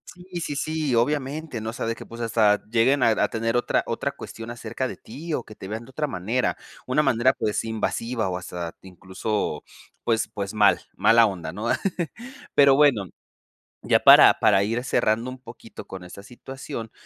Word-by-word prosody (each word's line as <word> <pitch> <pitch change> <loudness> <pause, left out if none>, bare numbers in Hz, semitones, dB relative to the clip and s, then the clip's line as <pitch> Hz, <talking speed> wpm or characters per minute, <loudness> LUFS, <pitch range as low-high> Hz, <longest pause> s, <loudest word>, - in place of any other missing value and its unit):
Sí, 180 -1 -8
sí, 145 -3 -4
sí, 155 -3 -1
obviamente, 145 +1 -1
¿no? 110 +1 -4
O - - -13
sea, - - -4
de 115 - -1
que - - -10
pues, 115 +1 -9
hasta 110 -2 +2
lleguen 120 +4 +3
a 115 - +5
a 110 - +2
tener 115 +1 -1
otra - - +1
otra - - -2
cuestión 115 +1 -9
acerca 120 +2 -4
de - - -7
ti 150 +8 -8
o - - -1
que 110 - -13
te 95 - -9
vean 110 +3 -5
de 130 - -16
otra 150 +2 -2
manera. 115 +4 -1 0.3
Una 140 +4 +2
manera, 130 0 +3
pues 105 +1 -2
invasiva 115 -1 -2
o 90 - -2
hasta 85 -2 -6
incluso 95 -2 -4 0.4
pues 110 -2 0
pues 100 0 -4
mal, 105 -1 +4 0.2
mala 115 0 +5
onda, 85 -6 -4
¿no? 105 +5 -5 0.9
Pero 140 -1 +6
bueno, 135 -8 +4 0.8
ya - - +3
para - - +9
para 100 -2 +4
ir 115 +4 -1
cerrando 115 0 +1
un 130 0 -9
poquito 115 -2 -12
con 95 -1 -8
esa 90 +2 -11
situación, 125 -1 -8
115 Hz, 185 wpm, -24 LUFS, 105-130 Hz, 0.9 s, para